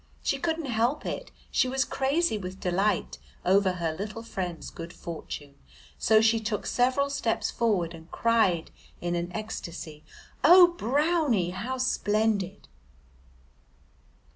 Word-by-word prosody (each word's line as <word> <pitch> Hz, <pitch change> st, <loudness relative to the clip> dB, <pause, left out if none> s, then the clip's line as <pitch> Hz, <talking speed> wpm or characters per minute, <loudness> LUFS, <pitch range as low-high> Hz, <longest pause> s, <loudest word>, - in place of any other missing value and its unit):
She -, -, 0 dB
couldn't 330 Hz, -2 st, -1 dB
help 240 Hz, +3 st, 0 dB
it. -, -, -4 dB, 0.2 s
She -, -, +3 dB
was 265 Hz, +1 st, +1 dB
crazy 280 Hz, +1 st, +1 dB
with 190 Hz, -2 st, -6 dB
delight 190 Hz, +4 st, 0 dB, 0.3 s
over 190 Hz, 0 st, +4 dB
her 170 Hz, -3 st, -2 dB
little 210 Hz, +6 st, -6 dB
friend's 180 Hz, -6 st, -5 dB
good 170 Hz, 0 st, -8 dB
fortune, 155 Hz, -4 st, -7 dB, 0.5 s
so 220 Hz, -1 st, +5 dB
she 225 Hz, +1 st, +4 dB
took 215 Hz, -2 st, -3 dB
several 260 Hz, +3 st, +1 dB
steps 230 Hz, -5 st, -1 dB
forward 195 Hz, -8 st, 0 dB
and 165 Hz, 0 st, -12 dB
cried 220 Hz, -8 st, +2 dB, 0.3 s
in 175 Hz, 0 st, -2 dB
an 175 Hz, 0 st, -2 dB
ecstasy, 170 Hz, -7 st, -6 dB, 0.4 s
"Oh, 350 Hz, +4 st, +9 dB
Brownie, 290 Hz, -, +1 dB
how 235 Hz, +8 st, -4 dB
splendid!" 215 Hz, -5 st, 0 dB
215 Hz, 125 wpm, -27 LUFS, 180-255 Hz, 0.5 s, Oh